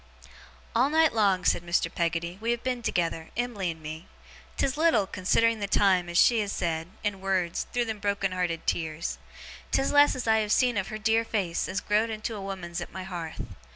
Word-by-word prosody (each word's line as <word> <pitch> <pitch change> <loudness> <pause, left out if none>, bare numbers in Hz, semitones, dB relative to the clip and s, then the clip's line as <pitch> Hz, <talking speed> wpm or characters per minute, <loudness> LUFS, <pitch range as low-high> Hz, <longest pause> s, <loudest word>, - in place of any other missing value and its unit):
'All 250 +4 +4
night 320 0 +4
long,' 195 -5 +2
said - - +3
Mr. 170 0 0
Peggotty, 170 +2 -2
'we 230 - -2
have 235 0 0
been 250 -1 -1
together, 165 -6 -1
Em'ly 235 -7 -1
and 160 -1 -7
me. 155 +2 -7 0.5
'Tis 265 - +1
little 310 -10 +3
(considering 220 +4 +1
the 200 - -2
time) 190 -3 +3
as 175 - -1
she 235 +3 +5
has 205 -2 -1
said, 165 -2 -2 0.2
in 200 -2 -2
wureds, 185 -3 -1
through 245 -1 0
them 220 -2 -4
broken 200 -1 0
hearted 175 -3 -2
tears; 160 0 -2 0.5
'tis 270 - +1
less 290 0 +5
as 250 -2 -4
I 220 0 +4
have 210 -1 -1
seen 245 +1 +3
of 190 -2 -1
her 215 - -5
dear 225 +1 +2
face, 195 -7 -1
as 190 - -2
grow'd 215 +2 +1
into 220 +1 -4
a 205 - -6
woman's 180 -3 -5
at - - -7
my 190 0 -6
hearth. 175 -4 -6
195 Hz, 205 wpm, -27 LUFS, 175-225 Hz, 0.5 s, she